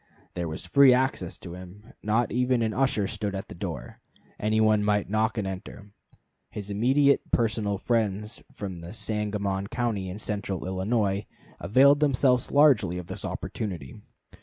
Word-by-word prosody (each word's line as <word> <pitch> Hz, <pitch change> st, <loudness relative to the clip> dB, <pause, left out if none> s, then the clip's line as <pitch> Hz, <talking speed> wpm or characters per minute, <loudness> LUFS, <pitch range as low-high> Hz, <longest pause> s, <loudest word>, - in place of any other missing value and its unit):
There 85 Hz, -1 st, -3 dB
was 80 Hz, -, -2 dB
free 140 Hz, -3 st, +6 dB
access 125 Hz, -9 st, -1 dB
to 85 Hz, -, -9 dB
him; 95 Hz, +4 st, -12 dB
not 110 Hz, +2 st, +1 dB
even 125 Hz, +1 st, +1 dB
an 110 Hz, -1 st, -1 dB
usher 130 Hz, -6 st, +1 dB
stood 100 Hz, 0 st, -3 dB
at 95 Hz, -, -6 dB
the -, -, -7 dB
door; 85 Hz, -, -6 dB, 0.4 s
any 110 Hz, +1 st, +1 dB
one 110 Hz, -1 st, +3 dB
might 105 Hz, -1 st, 0 dB
knock 110 Hz, +2 st, +1 dB
and 105 Hz, -, -1 dB
enter. 95 Hz, +1 st, -7 dB, 0.6 s
His 105 Hz, -1 st, -7 dB
immediate 135 Hz, +7 st, +3 dB
personal 110 Hz, -3 st, 0 dB
friends 105 Hz, -1 st, -1 dB
from 95 Hz, -4 st, -6 dB
Sangamon 105 Hz, -3 st, -2 dB
County 105 Hz, -5 st, -2 dB
and 95 Hz, +3 st, -7 dB
central 100 Hz, -4 st, -4 dB
Illinois 100 Hz, +2 st, -1 dB, 0.3 s
availed 135 Hz, +10 st, +5 dB
themselves 130 Hz, -4 st, +2 dB
largely 130 Hz, -, +4 dB
of 90 Hz, -, -6 dB
this -, -, -6 dB
opportunity. 90 Hz, -11 st, -5 dB
105 Hz, 150 wpm, -26 LUFS, 95-120 Hz, 0.6 s, free